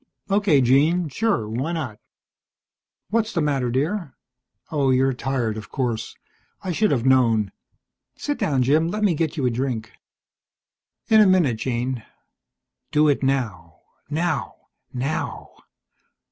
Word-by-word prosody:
"Okay, 195 -8 +4
Jean, 150 +7 +3
sure. 200 - 0
Why 130 +10 -2
not?" 130 -11 -4 1.1
"What's 225 0 +1
the - - 0
matter, 140 -5 0
dear? 145 - -2 0.6
Oh, 140 -4 +1
you're 130 +1 +3
tired, 125 -4 -2
of 110 - -8
course. 120 -4 -3 0.5
I 185 - -2
should 210 +5 +2
have 125 -3 0
known. 115 -6 +3 0.6
Sit 290 -1 -3
down, 135 -4 +1
Jim. 155 +6 +3
Let 215 +5 -2
me 200 -4 +4
get 160 0 -2
you 140 - 0
a 125 - +2
drink." 115 -3 -3 1.2
"In 220 -1 +7
a 210 - +6
minute, 170 -11 +3
Jean." 125 0 -2 0.9
Do 150 0 +4
it 145 - +1
now 110 -12 -2 0.3
now 160 +2 -1 0.4
NOW! 135 +5 -3
135 Hz, 130 wpm, -23 LUFS, 125-165 Hz, 1.2 s, In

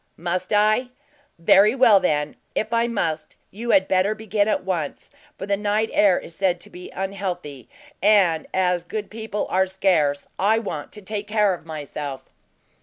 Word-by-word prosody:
"Must 180 +2 -3
I? 215 +4 +3 0.5
Very 200 +7 +5
well, 240 -6 +6
then; 150 -4 0 0.2
if 220 +2 -1
I 230 0 +2
must, 165 -9 -3 0.2
you 235 +4 -6
had 190 -4 +4
better 190 +3 +2
begin 215 -1 0
at 215 - 0
once, 175 -6 -4 0.3
for - - -5
the 200 0 +1
night 210 +2 0
air 195 -3 +4
is 165 - -10
said 185 -2 0
to - - -12
be 180 0 -10
unhealthy, 180 - -5 0.3
and 190 -6 +3
as 180 -2 +1
good 210 +4 -6
people 220 -1 -4
are 190 +1 +2
scarce, 170 -7 +1
I 210 +4 +3
want 195 -10 -5
to 210 - -11
take 205 +1 -5
care 210 -2 +2
of 165 -2 -9
myself." 145 -3 -6
190 Hz, 170 wpm, -23 LUFS, 170-210 Hz, 0.5 s, well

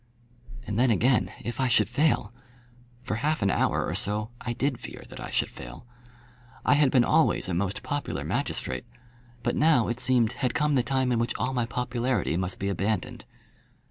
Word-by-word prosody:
And 105 +1 -2
then 130 +1 +4
again 120 +4 +3
if 120 +1 -5
I 130 - +2
should 110 -4 +3
fail! 120 -3 +1 0.7
For 110 - -2
half 150 0 0
an 100 - +3
hour - - +1
or - - -3
so 105 +3 -2
I 120 - -2
did 130 +1 -1
fear - - -8
that - - -10
I - - -6
should - - 0
fail. - - -10 0.8
I - - +5
had 145 -1 +4
been 125 -2 +4
always - - +2
a 90 - -2
most 95 +3 -1
popular 145 0 -3
magistrate, 65 - -2 0.6
but 120 - 0
now, 145 -7 +4
it 120 +1 -2
seemed, 120 -4 +3
had 125 +3 -2
come 150 0 +2
the 130 - +4
time 130 0 0
in 120 - +2
which 115 - -1
all 130 - -1
my 120 -2 0
popularity 125 - -1
must 90 +1 -1
be 100 - -3
abandoned. 100 +1 -2
120 Hz, 190 wpm, -27 LUFS, 105-130 Hz, 0.8 s, I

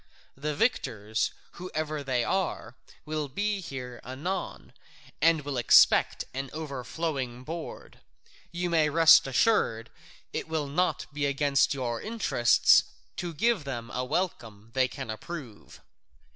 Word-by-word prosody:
The 150 +2 -3
victors, 110 - 0 0.2
whoever 155 -4 -4
they 130 -3 0
are, 180 -10 -2 0.3
will 155 -1 -2
be 205 +8 -1
here 125 -7 -7
anon, 165 +10 -5 0.5
and 165 0 +4
will 145 -3 -3
expect 120 - +5
an 135 +1 -4
overflowing 135 -3 -4
board. 165 +3 -8 0.5
You 175 0 -2
may 155 -2 +3
rest 165 0 +7
assured 125 - +1 0.4
it - - -3
will 160 -2 -1
not 180 +6 0
be 145 -1 0
against 140 0 +2
your 120 -3 -3
interests 215 - +4 0.3
to 175 -1 -3
give 220 +3 +1
them 120 -4 -6
a 125 - -2
welcome 115 - -3
they 130 -1 +3
can 130 -3 -6
approve." 120 -2 -9
145 Hz, 125 wpm, -28 LUFS, 125-165 Hz, 0.5 s, rest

